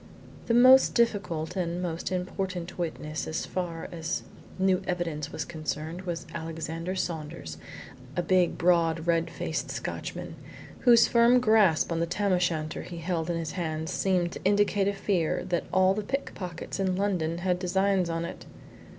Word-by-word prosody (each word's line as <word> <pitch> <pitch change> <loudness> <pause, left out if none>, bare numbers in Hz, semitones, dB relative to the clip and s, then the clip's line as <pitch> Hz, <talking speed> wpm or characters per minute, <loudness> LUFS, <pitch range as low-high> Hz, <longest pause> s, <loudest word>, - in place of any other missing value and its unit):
The 230 - +3
most 255 +2 +7
difficult, 195 -8 0
and 175 -2 -1
most 175 0 -3
important 185 -1 -3
witness, 155 -2 -3
as 160 - -2
far 170 -3 -4
as 165 -2 -3 0.3
new 190 0 +2
evidence 165 -5 -2
was - - -4
concerned 160 +1 -4
was 170 -1 -3
Alexander 165 +2 -4
Saunders, 150 - -4 0.6
a 175 - +1
big, 180 0 +2
broad 165 -2 +2
red 165 -1 +2
faced - - -3
Scotchman, - - -5 0.4
whose 235 -2 +6
firm 235 +1 +5
grasp 215 -9 +4
on 165 - 0
the 170 - 0
tam 195 +3 0
o' 180 - +3
shanter 160 -3 -1
he 175 - -8
held 165 0 -2
in 170 - 0
his 165 -2 -3
hand 160 -2 -3
seemed 180 -2 +1
to - - -8
indicate 205 0 +3
a 200 - +1
fear 190 -5 0
that 175 -1 0
all 190 0 +4
the 215 - -2
pickpockets 200 - -5
in 190 -1 +1
London 180 -4 0
had 180 0 0
designs 190 0 +1
on 165 0 -2
it. 170 - -8
175 Hz, 160 wpm, -28 LUFS, 165-190 Hz, 0.6 s, most